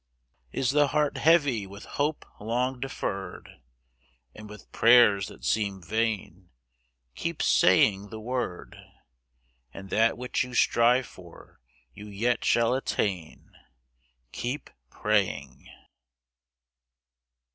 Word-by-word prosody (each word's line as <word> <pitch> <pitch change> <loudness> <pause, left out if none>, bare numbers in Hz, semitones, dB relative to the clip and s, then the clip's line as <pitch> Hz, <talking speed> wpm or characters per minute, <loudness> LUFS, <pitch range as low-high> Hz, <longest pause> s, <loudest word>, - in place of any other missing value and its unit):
Is 130 - 0
the 145 0 +3
heart 150 +1 0
heavy 145 - +3
with 100 +2 -11
hope 145 +1 -2
long 125 +4 -2
deferred, 95 - -6 0.7
And 105 -1 -12
with 105 0 -13
prayers 115 -5 +5
that - - -12
seem 100 0 0
vain? 100 -2 -3 0.6
Keep - - -4
saying 100 0 +3
the 110 - -8
word— 120 -5 -5 0.9
And 95 +7 -11
that 115 +1 +2
which 125 +2 -2
you 125 -1 -8
strive 120 +3 +3
for 90 -6 -16 0.3
you 105 +1 -11
yet 115 +4 -1
shall 115 +1 +2
attain. 100 -10 -3 0.8
Keep 125 +5 -5 0.2
praying. - - -2
115 Hz, 105 wpm, -27 LUFS, 100-125 Hz, 0.9 s, prayers